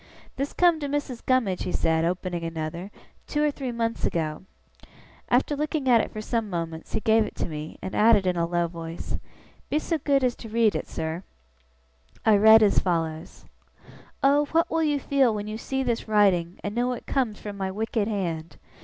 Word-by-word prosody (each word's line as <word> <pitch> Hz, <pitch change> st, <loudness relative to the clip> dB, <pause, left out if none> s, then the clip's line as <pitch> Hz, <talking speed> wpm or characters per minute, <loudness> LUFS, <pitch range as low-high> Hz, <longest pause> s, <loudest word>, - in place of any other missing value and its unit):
'This 275 Hz, +2 st, -2 dB
come 345 Hz, -3 st, +4 dB
to 290 Hz, -, -3 dB
Missis 280 Hz, -4 st, -3 dB
Gummidge,' 235 Hz, -8 st, +1 dB
he 180 Hz, -, -2 dB
said, 160 Hz, -1 st, +1 dB
opening 175 Hz, 0 st, -2 dB
another, 165 Hz, +3 st, -4 dB, 0.4 s
'two 295 Hz, 0 st, 0 dB
or 300 Hz, -, +3 dB
three 270 Hz, -3 st, -4 dB
months 230 Hz, -1 st, -2 dB
ago.' 155 Hz, +1 st, -2 dB, 0.8 s
After 260 Hz, +4 st, +2 dB
looking 300 Hz, -1 st, -2 dB
at 235 Hz, -3 st, +6 dB
it -, -, -4 dB
for 215 Hz, -, -6 dB
some 225 Hz, -1 st, -2 dB
moments, 165 Hz, -3 st, -5 dB
he -, -, +1 dB
gave 220 Hz, 0 st, +4 dB
it 210 Hz, -, -7 dB
to -, -, -2 dB
me, 155 Hz, -1 st, -7 dB
and 190 Hz, -, -5 dB
added 215 Hz, -3 st, +5 dB
in 180 Hz, -1 st, +1 dB
a 170 Hz, -1 st, 0 dB
low 175 Hz, 0 st, +1 dB
voice, 165 Hz, 0 st, -6 dB, 0.5 s
'Be 300 Hz, -, +1 dB
so 320 Hz, +1 st, -1 dB
good 275 Hz, -1 st, +2 dB
as 250 Hz, -2 st, +2 dB
read 225 Hz, -1 st, +2 dB
it, -, -, -3 dB
sir.' 160 Hz, +2 st, -4 dB, 1.0 s
I 220 Hz, -2 st, +6 dB
read 220 Hz, +2 st, +8 dB
as 205 Hz, -, +4 dB
follows: 165 Hz, -2 st, -3 dB, 0.8 s
'Oh 285 Hz, +2 st, +4 dB
what 330 Hz, +2 st, +1 dB
will 325 Hz, -, +1 dB
you 295 Hz, -2 st, +1 dB
feel 270 Hz, -5 st, +2 dB
when 205 Hz, 0 st, -4 dB
you 215 Hz, +1 st, -5 dB
see 265 Hz, +3 st, -2 dB
this 235 Hz, -3 st, -2 dB
writing, 190 Hz, -5 st, +2 dB
and 205 Hz, -, -3 dB
know 245 Hz, +2 st, 0 dB
it 240 Hz, -, -8 dB
comes 245 Hz, -7 st, -1 dB
from 205 Hz, -1 st, -7 dB
my 190 Hz, -1 st, -3 dB
wicked 215 Hz, +1 st, -1 dB
hand! 170 Hz, -7 st, -3 dB
215 Hz, 195 wpm, -26 LUFS, 175-255 Hz, 1.0 s, read